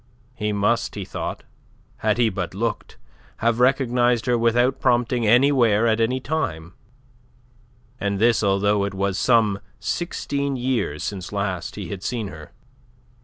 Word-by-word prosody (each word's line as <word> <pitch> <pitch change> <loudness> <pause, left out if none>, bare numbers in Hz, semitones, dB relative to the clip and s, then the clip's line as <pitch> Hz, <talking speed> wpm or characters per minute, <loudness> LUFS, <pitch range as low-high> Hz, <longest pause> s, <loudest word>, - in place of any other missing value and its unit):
He 105 -4 -2
must, 105 +3 0
he 100 -2 -5
thought, - - -5 0.5
had 110 0 0
he 120 -2 +3
but 90 -2 -4
looked, 115 +1 -3 0.4
have 115 +1 +1
recognized 125 -3 +2
her 125 - +2
without 120 +3 +2
prompting 120 -2 +1
anywhere 120 -3 +4
at 115 0 +2
any 125 +3 +1
time, 90 - -3 1.3
and 100 -1 -1
this 115 +3 +3
although 100 0 +2
it 100 -1 -3
was 100 0 -1
some 110 -5 +3 0.2
sixteen 140 -5 -2
years 125 - -1
since 95 -3 -5
last 100 -4 -3
he 100 -5 -6
had 100 -2 -6
seen 115 -2 -3
her. 75 -3 -11
115 Hz, 140 wpm, -23 LUFS, 100-125 Hz, 1.3 s, anywhere